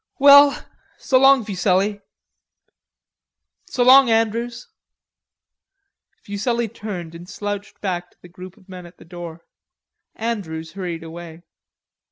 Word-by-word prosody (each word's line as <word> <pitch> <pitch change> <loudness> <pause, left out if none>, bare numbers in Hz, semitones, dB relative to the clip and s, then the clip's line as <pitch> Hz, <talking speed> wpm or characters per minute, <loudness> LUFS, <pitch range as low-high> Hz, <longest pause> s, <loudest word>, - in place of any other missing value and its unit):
"Well, 285 0 +6 0.3
so 255 - +1
long, 270 -3 +5
Fuselli." 200 +1 0 1.7
"So 245 - -1
long, 260 0 +7
Andrews." 230 +2 -1 1.6
Fuselli 230 +4 -2
turned 200 -7 -8
and 170 +2 -12
slouched 205 -1 -6
back 180 -3 -4
to - - -33
the - - -15
group 185 +2 -13
of 195 -3 -23
men 180 -2 -10
at 175 - -19
the - - -17
door. 170 -1 -10 0.7
Andrews 170 -9 -5
hurried 175 -4 -6
away. 165 0 -11
200 Hz, 115 wpm, -20 LUFS, 175-235 Hz, 1.7 s, long